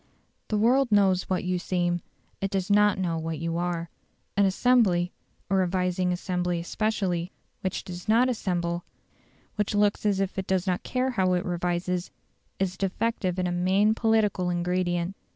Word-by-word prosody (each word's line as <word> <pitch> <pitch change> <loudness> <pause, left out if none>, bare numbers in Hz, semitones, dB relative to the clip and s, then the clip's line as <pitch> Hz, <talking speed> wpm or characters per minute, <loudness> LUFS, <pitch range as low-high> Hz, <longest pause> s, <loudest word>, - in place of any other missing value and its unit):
The 215 - 0
world 245 +3 +3
knows 195 -3 +3
what 185 - 0
you 180 0 -1
seem; 175 -1 0 0.4
it 195 - 0
does 190 0 -1
not 210 0 +5
know 170 -3 -1
what 160 0 -3
you 165 +2 -2
are. 170 -1 -2 0.4
An 200 0 +4
assembly 190 -4 +3 0.4
a 195 - +1
revising 180 -1 +1
assembly 180 -1 -1
especially 180 -1 -1 0.3
which 190 - -3
does 175 -1 -8
not 235 +3 +5
assemble, 175 -7 -1 0.7
which 210 0 0
looks 205 0 +2
as 200 -2 +2
if 195 0 -1
it 190 - -4
does 190 -1 +1
not 180 -2 0
care 255 +1 -1
how 190 -6 +2
it 180 +2 0
revises, 175 0 -1 0.5
is 185 -1 -1
defective 195 -1 -1
in 185 - 0
a 180 - 0
main 190 +4 +3
political 220 -5 +1
ingredient. 175 +1 -1
185 Hz, 160 wpm, -27 LUFS, 175-205 Hz, 0.7 s, not